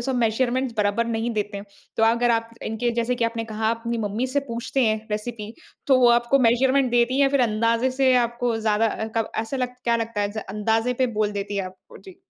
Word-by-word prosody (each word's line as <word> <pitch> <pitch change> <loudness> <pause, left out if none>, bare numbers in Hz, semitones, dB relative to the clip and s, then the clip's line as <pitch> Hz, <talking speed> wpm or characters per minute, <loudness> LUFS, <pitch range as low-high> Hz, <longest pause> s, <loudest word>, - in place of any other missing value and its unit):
उसमे 265 +1 -2
मेज़रमेंट 240 +2 0
बराबर 210 +3 +1
नहीं 230 +1 -2
देते 205 -1 -2
हैं। 200 - -9 0.3
तो 225 - +1
अगर 235 +1 +3
आप 230 0 0
इनके 225 +2 -1
जैसे 235 +1 0
कि 240 -2 -1
आपने 230 0 -2
कहा 220 0 -3
आप 230 0 -1
अपनी 235 0 -1
मम्मी 215 +4 -2
से 285 +2 0
पूछते 235 +2 -1
हैं 220 0 -1
रेसिपी 215 0 -4 0.3
तो 265 -2 +5
वो 245 - +6
आपको 240 +3 +3
मेज़रमेंट 255 +2 +3
देती 240 +1 +2
है - - +3
या 275 - +5
फिर 280 -1 +1
अंदाज़े 230 +2 +1
से 260 0 +2
आपको 240 -1 0
ज़्यादा 220 0 +1 0.3
क 225 - 0
ऐसा 225 +5 -2
लगता 250 -1 -4
क्या 235 -1 +2
लगता 230 -2 -3
है 205 +2 -2
अंदज़े 225 +4 0
पे 255 +1 +1
बोल 210 -1 0
देती 200 0 -4
है 195 - 0
आपको? 185 0 -12
जी। 380 -2 -14
230 Hz, 225 wpm, -23 LUFS, 220-250 Hz, 0.3 s, वो